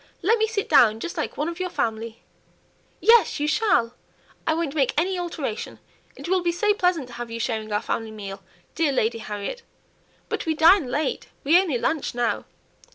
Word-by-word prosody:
let 445 +6 +3
me 440 - +3
sit 430 -2 -2
down 225 -7 +5
just 340 +8 -5
like 310 - -3
one 295 - -1
of 340 +1 -5
your 365 0 -2
family." 225 -6 -3 0.8
"Yes, 455 -9 +5
you 295 - 0
shall; 310 - +2 0.5
I 320 - +3
won't 325 -4 -2
make 275 -5 +1
any 370 +4 +1
alteration; 310 -10 -4 0.4
it - - -8
will 370 +1 +2
be 345 -1 +1
so 415 +4 +2
pleasant 360 -7 +1
to - - -11
have 240 0 -6
you 230 0 -5
sharing 220 -2 -2
our 210 - 0
family 225 -1 -2
meal, 200 -2 -8 0.3
dear 320 -3 +1
Lady 230 -3 0
Harriet. 210 - -5 0.7
But - - -3
we 320 - +1
dine 320 0 +6
late, 310 - -2 0.2
we 320 +6 +6
only 320 -10 -1
lunch 280 +1 -1
now. 240 -1 -1
305 Hz, 190 wpm, -24 LUFS, 230-355 Hz, 0.8 s, dine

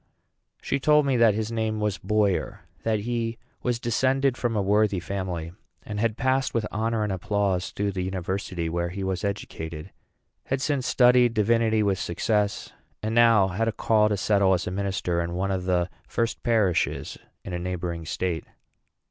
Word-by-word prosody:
She 140 - 0
told 150 +1 +4
me 135 -2 +2
that 115 -3 +5
his 110 +1 -2
name 110 -1 -1
was 105 -3 -1
Boyer; 105 -3 0 0.2
that 110 -2 0
he 115 0 -2 0.2
was 120 -2 -1
descended 130 +3 +1
from 120 -3 -1
a 105 - +2
worthy 105 -1 +2
family; 90 -3 -4 0.3
had 105 +1 -1
passed 130 0 +1
with 115 -2 +1
honor 110 +1 0
and 105 - -1
applause 95 0 0
through 100 0 -2
the 95 -1 -3
university 95 -1 -3
where 85 +1 -1
he 95 +2 -5
was 95 -2 -2
educated; 80 -6 -5 0.6
had 135 - 0
since 140 -2 -1
studied 125 -1 +5
divinity 110 0 +3
with 100 -2 +1
success; 105 +4 -1 0.3
and 110 +1 -1
now 115 -4 +5
had 110 +5 -1
a - - +2
call 105 -1 +2
to 105 - 0
settle 100 -1 +3
as 90 - -3
a 90 - -3
minister 95 -3 -1
in 85 +1 -3
one 95 +2 -1
of 95 -1 -2
the 90 -1 +1 0.2
first 115 0 -1
parishes 105 -7 0 0.3
in 90 - -5
a 90 - -2
neighboring 85 -2 -3
state. 85 +1 -2
105 Hz, 175 wpm, -25 LUFS, 95-115 Hz, 0.6 s, that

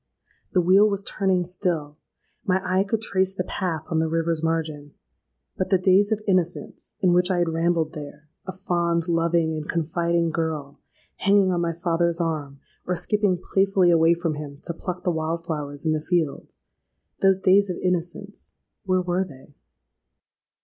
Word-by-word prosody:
The 185 - +4
wheel 195 +4 +5
was 200 -1 -2
turning 190 -3 0
still: 170 -5 -2 0.5
my 185 0 +1
eye 185 +1 +2
could 220 +2 -2
trace 190 -2 0
the 180 - -1
path 175 -4 -3
on 160 - -1
the 160 0 0
river's 165 0 0
margin;—but 150 - -5
the 190 - +4
days 190 +3 +3
of 215 -1 0
innocence, 180 -2 -1
in 180 -3 +4
which 180 +1 +3
I 185 - +1
had 175 -1 +1
rambled 165 -1 0
there—a 150 +4 -10
fond, 170 -2 -1
loving, 165 -1 +1
and 155 0 -6
confiding 170 +1 0
girl, 155 -3 -3 0.4
hanging 195 -1 +3
on 175 -1 0
my 170 -1 -1
father's 170 0 0
arm, 150 -5 -3 0.3
or 180 - 0
skipping 205 0 +1 0.2
playfully 195 -2 +4
away 165 0 +4
from 170 -2 -2
him 145 -1 -7
to 170 - -3
pluck 180 +1 -6
the 180 - +1
wild 165 +1 -3
flowers 145 -2 -5
in 160 - +2
the 155 -1 0
fields—those 180 +3 -2
days 195 +1 +4
of 180 - -3
innocence, 180 +2 -3 0.3
where 185 -1 +2
were 180 +1 0
they? 145 -5 -14
170 Hz, 160 wpm, -24 LUFS, 160-185 Hz, 0.5 s, wheel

